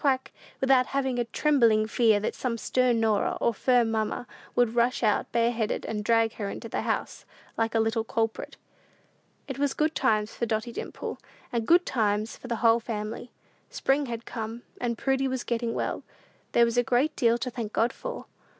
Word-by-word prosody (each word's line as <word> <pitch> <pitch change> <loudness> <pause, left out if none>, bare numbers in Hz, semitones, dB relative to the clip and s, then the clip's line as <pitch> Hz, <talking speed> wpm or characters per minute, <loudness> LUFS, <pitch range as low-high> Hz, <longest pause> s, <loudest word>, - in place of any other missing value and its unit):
quack!" 265 -2 +1 0.3
without 265 -1 +4
having 265 -2 -1
such 240 -1 -1
a - - -41
trembling 235 -8 +3
fear 220 -1 +3
that 210 - -2
some 240 -3 -2
stern 250 0 +1
Norah, 220 -2 +1
or 235 - +2
firm 240 +1 +2
mamma, 220 +2 -1 0.3
would 240 -2 +3
rush 240 +1 +1
out 215 -2 +1
bareheaded, 230 -2 0
and 210 -1 -3
drag 225 0 +3
her 205 -2 -3
into 230 - -6
the - - -2
house, - - -3 0.3
like 225 0 -1
a - - +4
little 225 0 +1
culprit. 225 0 -2 0.9
It 270 -1 -5
was 285 -1 +1
good 310 +1 +1
times 215 -5 +1
for 235 - -2
Dotty 220 +2 -1
Dimple, - - -6 0.3
and 230 -2 -1
good 350 +2 +5
times 215 -2 0
for - - -11
the 235 -1 -2
whole 230 0 +6
family. 220 +1 -5 0.4
Spring 275 +1 +1
had 230 -1 -5
come, 225 0 -6 0.2
and 235 -2 -1
Prudy 270 +2 +1
was 260 -1 -2
getting 235 -1 -2
well. - - -2 0.5
There 235 - +6
was 235 +1 -2
a - - +3
great 255 +6 +1
deal 235 -1 +3
to 250 +1 -4
thank 230 -3 -5
God 230 +3 +1
for! - - -6
235 Hz, 190 wpm, -27 LUFS, 225-255 Hz, 0.9 s, whole